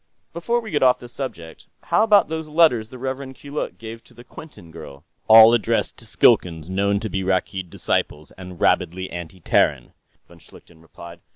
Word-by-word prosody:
"Before 235 +9 -1
we 220 -3 -9
get 145 - -1
off 125 -1 +4
the 125 - -12
subject, 115 -11 -9 0.2
how - - +1
about 210 -2 +4
those 160 0 -5
letters 150 -9 +2
the 130 - -11
Rev. 130 +1 -6
Keeluk 145 +3 -6
gave 115 0 -10
to 120 - -22
the 120 - -14
Quinton 125 - -14
girl?" 70 -1 -12 0.2
"All 110 +1 +8
addressed 120 - 0
to - - -9
Skilkans 80 -1 +1
known 100 +1 0
to 110 - -4
be 95 -2 -4
Rakkeed 95 -1 -2
disciples 75 -2 -3
and 90 -2 -12
rabidly 95 +2 0
anti 85 +1 -9
Terran," - - 0 0.3
von - - -18
Schlichten 80 -1 -19
replied. 85 +1 -13
110 Hz, 180 wpm, -21 LUFS, 90-135 Hz, 0.3 s, All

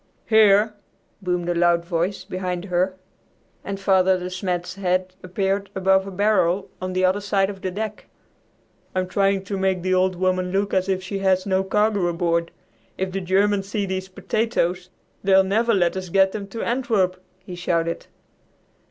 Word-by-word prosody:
"Here!" 215 -1 +5 0.5
boomed 180 -2 -1
a 175 - +1
loud 170 0 +2
voice 180 +2 -1
behind 185 -1 -4
her, 185 0 0 0.7
and 195 0 -5
Father 190 -1 +3
De 180 0 -5
Smet's 180 -2 -3
head 185 -1 -1
appeared 195 +2 -1
above 190 0 +2
a - - -6
barrel 190 -2 +1
on 185 0 -3
the 185 0 +2
other 190 +2 +1
side 200 -1 +1
of 195 -1 -12
the 185 - -2
deck. 210 +3 -5 0.9
"I'm 185 0 0
trying 195 +1 +1
to 195 0 -4
make 190 -2 0
the 185 0 +1
'Old 185 0 +2
Woman' 185 0 0
look 200 +1 0
as 190 0 +1
if 190 -1 0
she 195 +1 -4
had 190 -1 +2
no 190 -1 +1
cargo 205 -1 +1
aboard. 170 -1 0 0.5
If 190 0 -2
the 195 +1 -3
Germans 195 +2 +1
see 205 -1 -1
these 190 0 -4
potatoes, 185 -3 -1 0.3
they'll 190 0 +5
never 220 +5 +1
let 175 -2 +2
us 185 -1 -5
get 190 +1 +4
them 200 -1 -5
to 225 +3 -5
Antwerp," 210 -7 0 0.2
he 185 -1 -11
shouted. 170 -1 -1
190 Hz, 170 wpm, -23 LUFS, 180-195 Hz, 0.9 s, Here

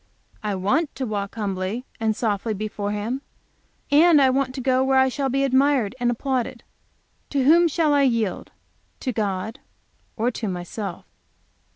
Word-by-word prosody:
I 210 -3 -2
want 265 - 0
to 265 - -3
walk 205 -3 -4
humbly 205 +2 -3
and 220 -1 +1
softly 215 -1 -1
before 205 0 -3
Him, 220 +6 -3 0.7
and 315 +1 +6
I 265 -2 +5
want 260 -1 0
to - - -4
go 260 0 +2
where 265 0 +2
I 265 0 +5
shall 270 +1 -2
be 275 +2 +1
admired 265 -4 +2
and 240 0 +1
applauded. 250 0 -2 0.7
To 275 -2 +1
whom 335 +5 +6
shall 315 -1 +1
I 285 - +4
yield? 230 -8 0 0.5
To 255 - -1
God? 210 +3 -2 0.6
Or 235 +2 +1
to 225 -2 -4
myself? 180 +1 -5
245 Hz, 160 wpm, -23 LUFS, 210-270 Hz, 0.7 s, and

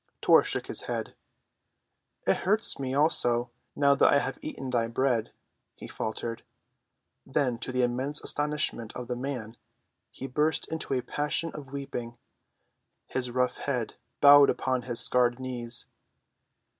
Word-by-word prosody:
Tor - - +6
shook - - -4
his - - +1
head. - - -3 1.1
"It - - +3
hurts 210 -2 +1
me, 130 -1 -3
also, 120 -5 +2 0.2
now 140 -1 +4
that 140 - +4
I - - +5
have 135 -1 -2
eaten 135 -4 -6
thy 115 -2 +1
bread," 120 -1 0 0.4
he - - -10
faltered. 115 +1 -4 0.8
Then 130 -3 -1
to 130 - -2
the 125 0 +1
immense 130 +4 0
astonishment 145 -6 0
of 125 -1 -6
the 125 - -2
man, 125 -4 -5 0.6
he - - -9
burst 150 +4 0
into 160 -4 -2
a 125 - -1
passion 150 +2 -2
of 140 -3 -9
weeping, 120 -4 -6 0.9
his 125 -1 -3
rough 125 +1 0
head 125 -5 -2 0.3
bowed 145 0 +8
upon 130 -1 0
his 120 -1 -1
scarred 125 0 +3
knees. 120 -2 -2
130 Hz, 145 wpm, -28 LUFS, 120-140 Hz, 1.1 s, bowed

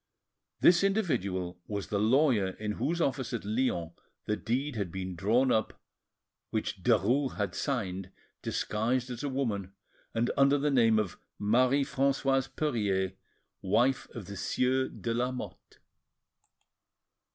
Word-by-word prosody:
This 175 +1 +6
individual 100 - 0
was 100 -2 -4
the 100 - 0
lawyer 110 -4 +3
in 105 0 -3
whose 165 +10 -1
office 135 -5 -1
at 115 - -3
Lyons 105 -7 0 0.3
the 105 - 0
deed 130 +6 -2
had 100 -5 -2
been 95 0 -4
drawn 115 +9 +2
up 110 -2 0 0.7
which 105 -3 -3
Derues 120 +6 +2
had 100 -3 -1
signed, 95 -9 -2 0.3
disguised 125 +4 -1
as 120 - -5
a 145 - -2
woman, 105 -8 -2 0.4
and 115 +2 +1
under 140 +1 +5
the 145 +1 +1
name 115 -4 +4
of 100 -4 -1 0.2
Marie 125 +6 +3
Francoise 135 -1 +1
Perier, 105 -10 0 0.5
wife 120 +7 +2
of 115 -5 -6
the 100 +1 -8
Sieur 130 +7 +1
de 115 - -4
Lamotte. 125 +2 -4
115 Hz, 130 wpm, -30 LUFS, 100-135 Hz, 0.7 s, This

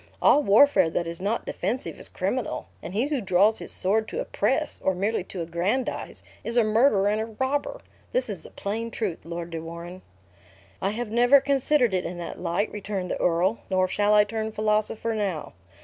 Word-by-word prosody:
All 295 - +5
warfare 270 - +5
that 170 - -1
is 170 +1 -5
not 210 +4 -1
defensive 220 +9 -3
is - - -6
criminal; - - -2 0.2
and 185 - -7
he 230 +5 +2
who 290 -5 0
draws 200 +3 +3
his - - -7
sword 215 +4 +1
to 470 - -4
oppress, - - 0
or 190 - +2
merely 200 +2 0
to 180 -3 -5
aggrandize, 180 +10 -2 0.2
is 235 +1 -3
a 235 - +6
murderer 215 -2 +3
and 210 +1 +1
a 220 - -3
robber. 275 - -2 0.3
This - - 0
is - - -5
the - - -12
plain 225 +3 -4
truth, 210 -7 -3
Lord 170 0 -5
de 165 -1 -4
Warenne." 170 +3 -8 0.8
"I 195 - +1
have 220 +1 -4
never 245 +4 +6
considered 270 -3 +2
it 185 -1 +1
in 175 - -5
that 175 - -6
light," 180 +4 -1
returned 195 -3 -4
the - - -2
earl, 180 +6 +2
"nor 185 -1 +2
shall 205 +2 +2
I 210 - +7
turn 220 0 -3
philosopher 215 +1 0
now. 195 -7 -3
210 Hz, 195 wpm, -26 LUFS, 185-230 Hz, 0.8 s, I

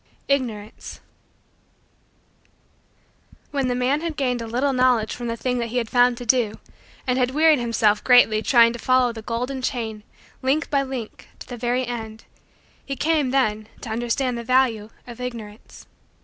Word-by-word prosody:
IGNORANCE 230 -6 -3 2.5
When 275 -3 0
the 250 - 0
man 260 +4 +1
had 330 -2 -4
gained 250 -3 0
a 230 - -5
little 255 +5 0
knowledge 250 -4 +2
from 240 - -5
the 230 0 -3
thing 250 +1 -1
that 235 - -2
he 240 +2 -4
had 230 -2 -2
found 245 -1 +4
to 245 - -7
do 230 -3 +2 0.5
and 255 -1 0
had 250 -1 +2
wearied 310 -2 +5
himself 225 -3 +1
greatly 245 -4 +5
trying 230 -1 +5
to 240 - -7
follow 255 0 +2
the 225 - -8
golden 250 +4 -3
chain, 225 -5 -3 0.4
link 280 +4 0
by 280 -1 +3
link, 260 -5 -6
to - - -11
the 245 - -6
very 245 +2 -1
end, 225 -2 -6 0.6
he 275 - -5
came, 305 -2 +1
then, 215 -5 0
to 235 - -7
understand 240 +2 -1
the - - -6
value 235 -4 +1 0.2
of 240 0 -10
Ignorance. 225 -4 -8
245 Hz, 165 wpm, -23 LUFS, 230-260 Hz, 2.5 s, wearied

